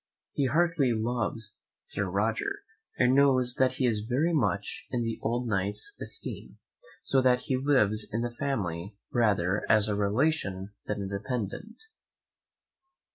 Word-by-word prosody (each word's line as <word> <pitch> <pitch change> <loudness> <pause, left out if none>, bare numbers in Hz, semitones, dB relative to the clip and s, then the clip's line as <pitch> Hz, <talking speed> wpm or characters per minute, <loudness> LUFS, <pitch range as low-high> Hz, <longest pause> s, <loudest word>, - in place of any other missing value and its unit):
He 140 - +1
heartily 155 -3 +2
loves 110 -3 -3 0.3
Sir 100 -1 -2
Roger, 110 +4 -1 0.3
and 125 +1 +4
knows 130 -3 +5
that 130 -1 +3
he 130 - 0
is 115 -4 +2
very 130 +10 0
much 100 -8 -1
in 120 -2 -1
the 115 0 -3
old 120 +2 -1
Knight's 100 - -1
esteem, - - -3 0.5
so 135 - +2
that 125 -1 +3
he 135 -2 -1
lives 130 -6 +2
in 115 - -1
the 120 0 -2
family 100 -8 -3 0.2
rather 100 -4 +1
as 110 0 +6
a 105 - 0
relation 100 -2 0
than 105 -1 -2
a - - -4
dependent. 115 - -5
115 Hz, 140 wpm, -28 LUFS, 100-130 Hz, 0.5 s, as